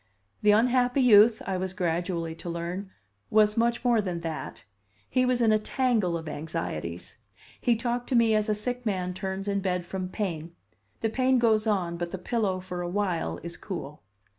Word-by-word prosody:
The 210 - +3
unhappy 245 +4 +4
youth, 220 -1 +6
I 190 -1 -1
was 185 0 -3
gradually 170 -2 -1
to 175 - -7
learn, 170 +3 -4 0.4
was 210 0 +4
much 235 +2 +1
more 235 -3 +4
than 180 -4 -3
that 155 -9 -5 0.4
he 255 0 +2
was 250 -1 +1
in 220 - +4
a 215 - +4
tangle 215 -7 +1
of 160 -1 -8
anxieties. 90 - -5 0.4
He 240 - +3
talked 240 +1 -2
to 260 - +1
me 230 -2 +4
as 215 0 +1
a 210 - +2
sick 245 +4 -3
man 185 -5 -1
turns 190 +1 -4
in 200 0 +1
bed 180 -2 -1
from 185 0 -4
pain; 170 -5 -4 0.5
the 225 - +1
pain 260 +2 +3
goes 225 -2 +3
on, 180 -5 0
but 175 0 -3
the 190 - -5
pillow 195 -1 -1
for 180 -1 -5
a 175 - -3
while 185 -3 -1
is 170 0 -6
cool. 150 -6 -7
195 Hz, 190 wpm, -27 LUFS, 175-230 Hz, 0.5 s, youth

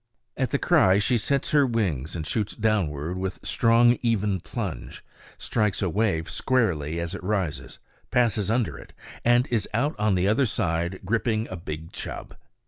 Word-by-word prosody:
At - - -1
the - - +1
cry 95 +1 +4
she 105 +4 +2
sets 135 +5 0
her 145 -1 +5
wings 90 - -1
and 80 -2 -4
shoots 105 +5 -2
downward 90 -6 -1
with 95 0 -3
strong, 120 +1 +4
even 105 -5 +1
plunge, 90 - -6 0.3
strikes 105 -3 0
a 90 - 0
wave 95 -5 0
squarely 85 - 0
as 85 +1 -3
it 95 - -7
rises, 95 -6 -2 0.3
passes 110 -5 +1
under 120 0 0
it, - - -14 0.3
and 120 +1 +4
is 115 -3 0
out 140 +6 +1
on 105 -2 +2
the 90 +1 +1
other 115 +6 +3
side 85 -3 -1
gripping 110 +1 0
a - - -3
big 80 -2 -7
chub. - - -7
105 Hz, 165 wpm, -25 LUFS, 85-115 Hz, 0.3 s, her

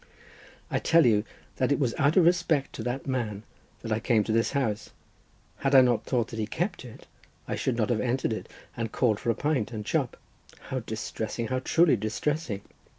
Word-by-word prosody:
"I - - +1
tell 165 -1 +4
you 110 -2 +3 0.3
that 130 +1 +1
it 140 - +3
was 125 -5 0
out 145 +2 +2
of 180 - +6
respect 170 -5 +2
to - - -6
that 125 +3 -3
man 115 -6 -2 0.4
that 115 - -5
I 110 - +1
came 115 -1 +2
to 110 - -3
this 115 +3 +1
house. 115 -7 -1 0.7
Had 135 0 +1
I 130 - +10
not 120 -3 +2
thought 120 -3 0
that 115 - -6
he 105 - -1
kept 175 - -2
it, 120 -3 -12 0.4
I - - -2
should 125 -3 -1
not 110 0 +1
have 110 -3 +1
entered 125 -1 0
it 110 - -6 0.3
and 115 -2 -3
called 110 -5 +1
for - - -3
a 115 - +2
pint 145 -6 0
and 105 -3 -5
chop. - - -1 0.4
How 130 - -4
distressing! 110 0 -4
how 130 0 0
truly 155 +1 +3
distressing!" 110 +1 -2
120 Hz, 205 wpm, -27 LUFS, 110-140 Hz, 0.7 s, I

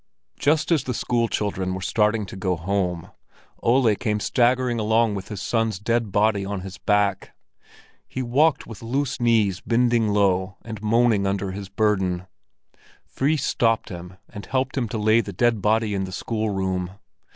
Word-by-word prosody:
Just 155 +4 +2
as 155 -6 +3
the 125 - -2
school 120 -1 0
children 95 -4 -2
were - - -4
starting 105 +2 +1
to 95 - -10
go 95 -1 -1
home, 90 0 -2 0.5
Ole 120 -2 +3
came 105 0 -1
staggering 125 +1 +1
along 110 0 +2
with 95 -2 -5
his 100 -4 -6
son's 115 -3 0
dead 115 +1 -1
body 105 0 +2
on 100 -1 -4
his 95 0 -9
back. 105 -2 0 0.7
He 130 - -4
walked 135 +4 +2
with 115 - -10
loose 130 +3 -2
knees 110 -6 +2
bending 120 -1 +2
low 95 -2 +1
and 110 -3 -7
moaning 110 -2 +2
under 100 -1 -1
his 100 0 -7
burden. 95 -3 0 0.8
Fris 145 +1 0
stopped 115 -4 +1
him 90 0 -9
and 105 - -10
helped 135 0 -1
him 120 -5 -1
to 110 - -3
lay 110 +2 +4
the 100 -3 -7
dead 115 +2 +1
body 110 +1 +1
in 95 -1 -1
the 95 - -8
schoolroom. 95 -4 -2
105 Hz, 165 wpm, -23 LUFS, 95-120 Hz, 0.8 s, lay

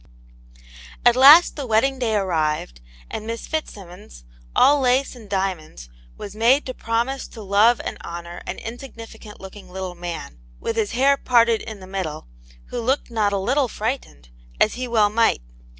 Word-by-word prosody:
At 240 - +6
last 285 +7 +8
the 280 -4 -5
wedding 255 +4 +1
day 225 -4 0
arrived, 155 - -1 0.3
and 215 - -6
Miss 230 0 -5
Fitz 315 0 -3
simmons, 175 - -13 0.3
all 290 +1 +5
lace 260 +1 +1
and 220 -4 -14
diamonds, 185 - -3 0.3
was 200 0 -8
made 240 +6 +3
to 255 - -5
promise 235 +4 -2
to 220 - -11
love 205 +4 +4
and - - -5
honour 170 +1 -8
an - - -4
insignificant 225 -3 -10
looking 195 +1 -12
little 185 0 -6
man, 170 - -7 0.2
with 225 - -3
his 220 -2 -1
hair 275 +3 +3
parted 235 -4 +3
in 220 -4 -9
the - - -10
middle, 185 - -5 0.4
who 245 - -4
looked 260 +2 -1
not 215 -3 +1
a 200 - 0
little 255 +8 +1
frightened, 215 - -5 0.3
as 215 - +3
well 235 -4 +1
he - - -14
might. 230 - +2
220 Hz, 165 wpm, -22 LUFS, 190-250 Hz, 0.4 s, last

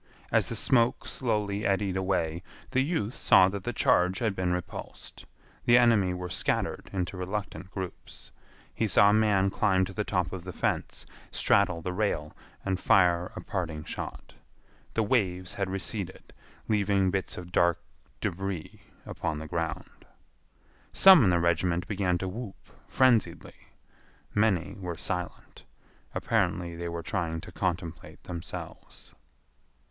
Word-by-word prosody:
As - - +2
the - - -3
smoke 120 -2 +2
slowly 105 -4 -1
eddied 100 -2 +1
away, 90 -4 -1 0.3
the 130 0 +3
youth 135 - -1
saw 95 - +5
that 100 -1 -6
the 120 - -1
charge 95 -4 +2
had 110 -4 -1
been 90 -1 0
repulsed. 90 -1 -6 0.4
The 120 0 +6
enemy 115 -6 +4
were 90 0 -4
scattered 90 - -1
into 90 -1 -3
reluctant 95 +1 -4
groups. 95 -2 -8 0.4
He 110 - 0
saw 100 +1 +6
a - - +3
man 100 -3 +3
climb 95 -3 +2
to 95 - -9
the 105 - -1
top 90 -3 -1
of 95 -2 -6
the 90 - -6
fence, - - -2 0.2
straddle 85 -2 +2
the 90 - -3
rail, 90 -7 -1 0.3
and 95 -1 0
fire 90 -2 +3
a - - -5
parting 85 -5 -4
shot. - - -7 0.6
The 115 - +2
waves 95 -6 0
had 100 -2 -2
receded, 95 +1 -4 0.3
leaving 100 -3 +2
bits 95 0 -2
of 90 0 -8
dark 85 0 +3 0.4
débris 95 -2 -4 0.3
upon 75 - -3
the 80 +1 -6
ground. 80 0 -5 0.9
Some 190 -7 +8
in - - +4
the 90 - +3
regiment 85 +1 +1
began 95 -4 0
to 95 - -4
whoop 105 +1 -8 0.2
frenziedly. 115 -10 +1 0.7
Many 105 -5 +1
were 90 -3 -5
silent. 90 +1 -5 0.5
Apparently 85 -1 0
they 85 0 -4
were 85 0 -5
trying 80 -1 -2
to - - -10
contemplate 85 -3 -4
themselves. 85 -2 -8
95 Hz, 140 wpm, -28 LUFS, 90-105 Hz, 0.9 s, Some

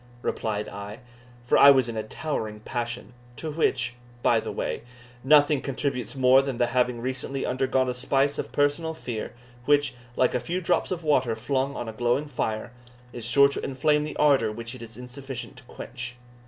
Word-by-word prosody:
replied 105 -1 -2
I; 100 +3 -8 0.4
for - - +4
I 140 - +10
was 130 -3 +5
in 115 - -5
a 110 - -1
towering 110 -3 -4
passion, 120 -1 -4 0.2
to 155 +7 -5
which, 125 -5 +1 0.3
by - - +4
the - - -5
way, - - -3 0.4
nothing 145 0 +5
contributes 135 -3 -3
more 130 0 +6
than 135 -3 -4
the 120 - +3
having 125 -1 0
recently 130 +2 -3
undergone 130 0 +1
a 125 - 0
spice 135 +3 +1
of - - -4
personal 145 +3 +1
fear, 120 -8 -5 0.3
which, 145 0 +3 0.2
like 130 - +2
a 125 - +1
few 175 +8 -2
drops 180 -1 +1
of 175 -2 -3
water 130 -7 +2
flung 135 +4 -1
on 120 - -4
a 110 - -5
glowing 120 +5 +1
fire, 110 -6 -3 0.4
is 120 -2 -5
sure 140 +3 +6
to 140 - -3
inflame 150 +3 +1
the 150 - -5
ardour 135 -7 +4
which 115 +2 -6
it 130 - -10
is 115 -1 -10
insufficient 125 +1 -7
to 125 - -13
quench. 125 0 -7
130 Hz, 185 wpm, -26 LUFS, 120-140 Hz, 0.4 s, I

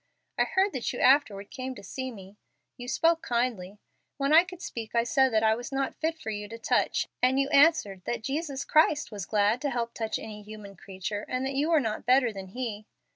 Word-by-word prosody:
I - - +4
heard 385 0 +1
that 260 -3 -2
you 245 - -6
afterward 235 -7 +3
came 260 -1 -5
to - - -11
see 260 -1 -5
me. 195 -4 -12 0.4
You 245 - -9
spoke 330 +5 +2
kindly. 235 -6 -2 0.4
When 275 +1 +1
I 330 +2 +8
could 365 -1 -11
speak 230 -9 -7
I 235 - +4
said 265 +2 +3
that 220 0 +2
I 220 0 +4
was 240 +4 -6
not 270 0 -1
fit 325 +1 -2
for 225 -8 -5
you 210 -1 -5
to 225 +2 -8
touch, - - 0
and 255 +2 +3
you 275 - +2
answered 280 - +4
that 235 -2 -3
Jesus 280 +1 -3
Christ 305 -3 +3
was 200 -4 -6
glad 210 +3 +2
to 290 - 0
help 235 -2 -3
touch 225 -1 -2
any 210 -1 -8
human 210 -1 -11
creature, 195 +2 -5
and 255 +1 -1
that 270 - -2
you 285 +4 0
were 325 -2 +5
not 225 -3 -3
better 250 -2 +4
than 195 -1 -7
He! 215 0 -5
240 Hz, 225 wpm, -28 LUFS, 210-275 Hz, 0.4 s, I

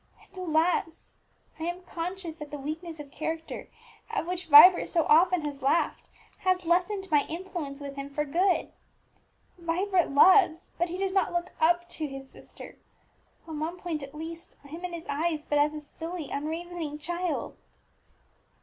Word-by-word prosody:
And, - - -24
alas! 330 -2 0 0.5
I 320 - -3
am 350 +1 -4
conscious 345 -1 -5
that 300 -1 -7
the 295 - -6
weakness 315 +3 -6
of 285 -2 -9
character 320 +2 -5 0.4
at - - -2
which 360 0 -4
Vibert 325 +4 +9
so 330 -3 +2
often 345 +1 +4
has 285 -2 -5
laughed, 275 +6 0 0.3
has 370 -1 +1
lessened 365 +3 +1
my 295 -2 +5
influence 330 -5 -5
with 280 -1 -8
him 275 0 -5
for 295 +1 -2
good. 355 +6 +1 0.9
Vibert 355 +2 +1
loves 350 +3 +5
but 345 0 +1
he 355 - -4
does 385 0 -1
not 385 -2 +2
look 345 +1 -2
up 345 +2 +3
to 310 - -3
his 270 -1 -9
sister; - - -13 0.7
on 315 -2 -5
one 330 +3 -3
point, 335 -4 -4
at 275 +1 -9
least, 325 +2 -8
I - - -13
am 330 +4 -8
in 360 -1 -4
his 335 -1 -6
eyes 310 +1 -1
but 295 - +1
as 300 +1 +2
a - - -4
silly, 325 +1 -7
unreasoning 320 +1 -4
child!" 345 +2 -3
330 Hz, 170 wpm, -28 LUFS, 300-355 Hz, 0.9 s, Vibert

